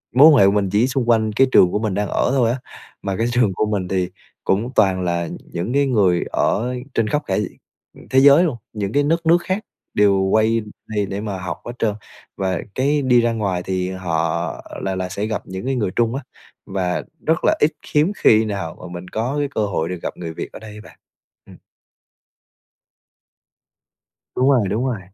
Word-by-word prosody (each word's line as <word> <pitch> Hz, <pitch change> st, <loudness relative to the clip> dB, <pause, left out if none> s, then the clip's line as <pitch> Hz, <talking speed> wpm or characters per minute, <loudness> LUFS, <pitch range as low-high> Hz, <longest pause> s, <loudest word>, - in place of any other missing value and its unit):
mối 140 Hz, +5 st, +9 dB
quan 155 Hz, -, +6 dB
hệ 100 Hz, -, +7 dB
của 100 Hz, -, +5 dB
mình 100 Hz, -1 st, +1 dB
chỉ 110 Hz, +5 st, +3 dB
xung 130 Hz, -2 st, -1 dB
quanh 110 Hz, -2 st, +3 dB
cái 135 Hz, +5 st, +4 dB
trường 90 Hz, -, +6 dB
của -, -, 0 dB
mình 110 Hz, -3 st, -1 dB
đang 105 Hz, +1 st, -1 dB
ở -, -, 0 dB
thôi 125 Hz, -4 st, +2 dB
á, 130 Hz, -, -3 dB, 0.4 s
mà 95 Hz, -, -2 dB
cái 115 Hz, -, +1 dB
trường 120 Hz, -5 st, +2 dB
của 110 Hz, -, 0 dB
mình 95 Hz, -3 st, -1 dB
thì 90 Hz, -1 st, -1 dB, 0.3 s
cũng 110 Hz, +6 st, 0 dB
toàn 95 Hz, -3 st, +3 dB
là 85 Hz, -2 st, -1 dB, 0.2 s
những 90 Hz, +8 st, -3 dB
cái 140 Hz, 0 st, +3 dB
người 95 Hz, -8 st, +2 dB
ở 125 Hz, +4 st, 0 dB, 0.2 s
trên 115 Hz, -, +1 dB
khắp 150 Hz, +7 st, 0 dB
cả -, -, -1 dB, 0.7 s
thế 130 Hz, -, +4 dB
giới 140 Hz, +5 st, +7 dB
luôn, 155 Hz, -9 st, -1 dB, 0.2 s
những 100 Hz, -2 st, -3 dB
cái 145 Hz, -, +3 dB
đất 165 Hz, +3 st, 0 dB
nước 165 Hz, +2 st, +6 dB
khác 190 Hz, +3 st, -2 dB, 0.3 s
đều 100 Hz, -2 st, +4 dB
quay 110 Hz, +4 st, +2 dB, 0.3 s
đây 105 Hz, -2 st, -1 dB
để 100 Hz, +1 st, -5 dB
mà 105 Hz, -3 st, -4 dB
học 90 Hz, -2 st, -4 dB
hết 120 Hz, -, -4 dB
trơn, 105 Hz, -2 st, 0 dB, 0.4 s
và 95 Hz, -2 st, -1 dB, 0.2 s
cái 145 Hz, +3 st, +1 dB
đi 125 Hz, -3 st, +4 dB
ra 115 Hz, 0 st, +1 dB
ngoài 95 Hz, -5 st, -2 dB
thì 95 Hz, -1 st, -2 dB
họ 90 Hz, -4 st, -2 dB, 0.2 s
là 95 Hz, -1 st, -1 dB
là 95 Hz, 0 st, -3 dB
sẽ 100 Hz, +2 st, -3 dB
gặp 110 Hz, -1 st, -2 dB
những 95 Hz, +4 st, -6 dB
cái 135 Hz, 0 st, 0 dB
người 105 Hz, -7 st, -1 dB
Trung 115 Hz, +1 st, +1 dB
á 135 Hz, -, -4 dB, 0.4 s
và 90 Hz, -2 st, -2 dB, 0.2 s
rất 160 Hz, 0 st, +2 dB
là -, -, +4 dB
ít, 150 Hz, -, +4 dB
khiếm 150 Hz, +2 st, +2 dB
khi 110 Hz, 0 st, +5 dB
nào 100 Hz, -6 st, -4 dB
mà -, -, -8 dB
mình 90 Hz, +1 st, -7 dB
có 115 Hz, +8 st, -2 dB
cái 145 Hz, -, 0 dB
cơ 105 Hz, -, +1 dB
hội 85 Hz, -5 st, -2 dB
được 90 Hz, -1 st, -4 dB
gặp -, -, -4 dB
người 85 Hz, -2 st, -6 dB
Việt -, -, -6 dB
ở -, -, -8 dB
đây 105 Hz, -1 st, -10 dB
bạn. -, -, -16 dB, 0.5 s
Ừm. -, -, -14 dB, 2.8 s
Đúng 130 Hz, +2 st, +3 dB
rồi, 120 Hz, -8 st, +3 dB
đúng 110 Hz, +7 st, -1 dB
rồi. 120 Hz, -6 st, -2 dB
110 Hz, 210 wpm, -20 LUFS, 95-125 Hz, 2.8 s, mối